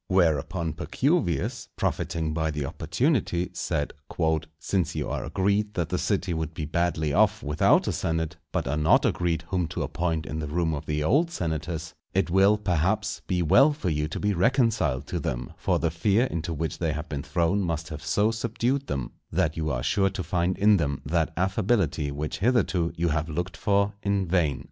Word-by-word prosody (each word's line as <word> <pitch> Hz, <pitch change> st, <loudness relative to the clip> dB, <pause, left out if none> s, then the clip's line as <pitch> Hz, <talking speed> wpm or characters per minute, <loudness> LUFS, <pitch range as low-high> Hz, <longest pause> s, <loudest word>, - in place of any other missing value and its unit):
Whereupon 85 Hz, -2 st, +1 dB
Pacuvius, 125 Hz, -, 0 dB
profiting 80 Hz, -2 st, -1 dB
by 80 Hz, 0 st, 0 dB
the 75 Hz, -2 st, -2 dB
opportunity, 90 Hz, -, 0 dB
said, 75 Hz, -, -2 dB, 0.6 s
"Since 85 Hz, +2 st, -1 dB
you 75 Hz, -2 st, -2 dB
are -, -, -2 dB
agreed 100 Hz, +2 st, 0 dB
that 85 Hz, -3 st, -1 dB
the 90 Hz, -, -1 dB
city 95 Hz, -3 st, 0 dB
would 80 Hz, -1 st, -3 dB
be 75 Hz, -, -3 dB
badly 80 Hz, -1 st, 0 dB
off -, -, +3 dB
without 75 Hz, +1 st, +3 dB
a -, -, +2 dB
senate, 80 Hz, -1 st, -2 dB
but -, -, -1 dB
are 75 Hz, -, 0 dB
not 75 Hz, +1 st, +4 dB
agreed 85 Hz, -2 st, 0 dB
whom 90 Hz, -3 st, 0 dB
to -, -, -3 dB
appoint 80 Hz, -2 st, -1 dB
in 80 Hz, +3 st, -4 dB
the 75 Hz, -, -3 dB
room 80 Hz, +1 st, 0 dB
of 75 Hz, 0 st, -5 dB
the 75 Hz, 0 st, 0 dB
old 145 Hz, -, +3 dB
senators, 80 Hz, -, -3 dB, 0.2 s
it 95 Hz, -2 st, +1 dB
will, 100 Hz, +3 st, +5 dB
perhaps, 100 Hz, +3 st, 0 dB
be 90 Hz, -2 st, +1 dB
well 135 Hz, -, +6 dB
for 115 Hz, -, -2 dB
you 75 Hz, 0 st, 0 dB
to 80 Hz, -, -5 dB
be 105 Hz, 0 st, +1 dB
reconciled 100 Hz, -, +2 dB
to 85 Hz, -, -3 dB
them; 60 Hz, -4 st, -4 dB
for -, -, 0 dB
the 85 Hz, -, 0 dB
fear 100 Hz, +8 st, +2 dB
into 85 Hz, -7 st, -3 dB
which 80 Hz, 0 st, -3 dB
they 80 Hz, -3 st, 0 dB
have 75 Hz, +1 st, -5 dB
been 70 Hz, -2 st, -4 dB
thrown 85 Hz, +6 st, +1 dB
must 80 Hz, -3 st, -2 dB
have 75 Hz, 0 st, -7 dB
so 105 Hz, +8 st, +2 dB
subdued 120 Hz, +4 st, -1 dB
them, 65 Hz, -3 st, -3 dB, 0.2 s
that 80 Hz, -2 st, +1 dB
you 80 Hz, -1 st, -2 dB
are -, -, -2 dB
sure 95 Hz, +7 st, +2 dB
to 95 Hz, -1 st, -4 dB
find 90 Hz, +2 st, 0 dB
in 105 Hz, +1 st, +5 dB
them 70 Hz, -5 st, -1 dB
that 80 Hz, +2 st, +1 dB
affability 95 Hz, -, +1 dB
which 75 Hz, +2 st, -4 dB
hitherto 95 Hz, -7 st, +2 dB
you 85 Hz, 0 st, +1 dB
have 80 Hz, +2 st, -1 dB
looked 85 Hz, +2 st, -3 dB
for 100 Hz, +2 st, +1 dB
in 100 Hz, -1 st, 0 dB
vain." 80 Hz, -5 st, +1 dB
85 Hz, 190 wpm, -26 LUFS, 80-100 Hz, 0.6 s, well